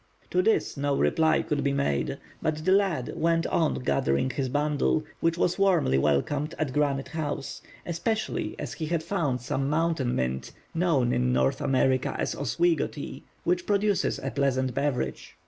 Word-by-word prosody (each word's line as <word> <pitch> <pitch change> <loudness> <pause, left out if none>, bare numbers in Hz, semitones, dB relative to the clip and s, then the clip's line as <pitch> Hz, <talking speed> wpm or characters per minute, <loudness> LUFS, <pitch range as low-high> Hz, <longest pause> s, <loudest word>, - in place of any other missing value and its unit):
To 180 - +3
this 220 -5 +1
no 140 0 0
reply 160 -1 +3
could 145 -1 -1
be 140 - +1
made, 140 - 0 0.2
but 155 0 -2
the 185 - +3
lad 190 -10 +2
went 165 0 +1
on 160 -2 +1
gathering 70 - +1
his 130 +1 -2
bundle, 150 +2 +1 0.2
which 165 0 +1
was 180 +2 +1
warmly 175 - +3
welcomed 140 - 0
at 145 -5 -2
Granite 140 -2 0
House; 150 -2 -4 0.2
especially 195 +6 -2
as - - -5
he 160 - -4
had 165 0 -1
found 160 - -1
some 135 +2 -1
Mountain 155 -5 +1
Mint, 65 +1 -2 0.2
known 165 -8 +2
in 60 0 +1
North 65 +1 +1
America 130 -1 +1
as - - -1
"Oswego 155 +4 +1
Tea," 140 -2 -8 0.2
which 175 0 0
produces 205 -1 +1
a 135 - -4
pleasant 130 -2 0
beverage. 130 - -2
145 Hz, 165 wpm, -27 LUFS, 130-165 Hz, 0.2 s, To